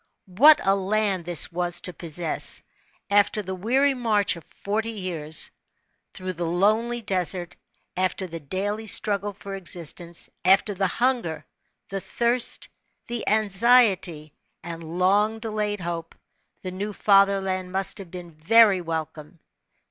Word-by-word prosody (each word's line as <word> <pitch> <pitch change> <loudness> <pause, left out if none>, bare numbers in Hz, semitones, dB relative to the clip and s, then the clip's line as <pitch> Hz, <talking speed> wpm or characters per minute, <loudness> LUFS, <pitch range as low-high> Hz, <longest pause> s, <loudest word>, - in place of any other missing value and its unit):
What 295 +9 +7
a 195 - +4
land 195 -2 -1
this 175 -1 +3
was 175 0 -2
to 180 - -5
possess! 165 0 +3 0.5
After 205 +1 +2
the 190 0 -5
weary 260 +9 +1
march 220 -7 0
of 170 - -11
forty 215 +3 -4
years, 175 -8 0 0.6
through 185 -1 -6
the 170 -1 -4
lonely 215 +7 +1
desert, 180 -2 -1 0.4
after 185 +1 -1
the 165 -2 -7
daily 205 +8 -4
struggle 205 0 0
for 200 0 -10
existence, 175 -2 -4 0.2
af^er 195 +3 +3
the 195 0 0
hunger, 240 -7 -1 0.4
the 195 0 -4
thirst, 235 +5 +1 0.4
the 240 -1 -5
anxiety, 200 - +2 0.3
and 165 -1 -7
long 190 +6 +1
delayed 210 -2 -3
hope, 170 -1 -5 0.5
the 185 - -5
new 205 +3 -5
fatherland 195 -2 +2
must 190 +1 -2
have 190 -3 -10
been 175 -1 -9
very 195 +5 +4
welcome. 160 -1 -6
190 Hz, 130 wpm, -24 LUFS, 175-210 Hz, 0.6 s, What